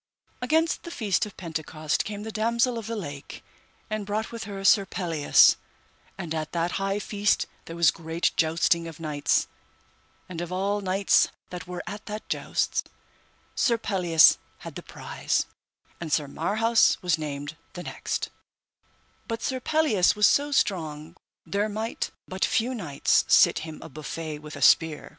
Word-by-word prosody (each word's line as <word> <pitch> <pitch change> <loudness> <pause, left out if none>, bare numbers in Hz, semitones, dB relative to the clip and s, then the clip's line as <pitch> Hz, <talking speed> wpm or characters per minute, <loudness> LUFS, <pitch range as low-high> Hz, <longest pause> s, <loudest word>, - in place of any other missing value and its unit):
Against 320 +6 +1
the - - -8
feast 210 - 0
of 205 - -14
Pentecost 155 -3 -2
came 210 -1 -5
the 220 - -5
Damosel 235 +2 +1
of 225 - -8
the 230 - -3
Lake 145 -9 -7 0.4
and 215 -1 -3
brought 210 +2 -3
with 230 -3 -6
her 200 -1 -6
Sir 200 +1 +6
Pelleas; 170 -6 +4 0.6
and 160 -2 -4
at 155 -1 -4
that 170 0 0
high 195 +1 0
feast 205 0 +1 0.2
there 165 - -8
was 170 -3 +5
great 165 +1 -1
jousting 165 +1 +2
of 165 -1 -10
knights, 150 -3 +1 0.8
and 175 -2 -6
of 175 0 -5
all 200 +3 0
knights 195 +1 +3 0.2
that 180 0 -7
were 180 -1 -5
at 210 +1 -8
that 210 0 -6
jousts, - - -1 0.7
Sir 235 -3 +2
Pelleas 180 -7 +5 0.2
had - - -8
the - - -7
prize, - - -2 0.5
and 165 -3 -6
Sir 145 -1 +1
Marhaus 220 +10 +2
was 175 -3 +2
named 145 0 -5 0.2
the 175 - -7
next; - - -4 1.0
but 230 -1 -4
Sir 260 -1 -1
Pelleas 255 - +3
was 210 0 +4
so 290 +5 +3
strong 160 - -1 0.3
there 205 +2 -1
might 220 +2 -3 0.2
but 190 0 -3
few 245 +3 +1
knights 165 - +1
sit - - +5
him 160 -1 -8
a - - -8
buffet 155 +1 -6
with 150 0 -9
a 140 - -3
spear. 160 +1 +4
185 Hz, 160 wpm, -26 LUFS, 160-215 Hz, 1.0 s, Sir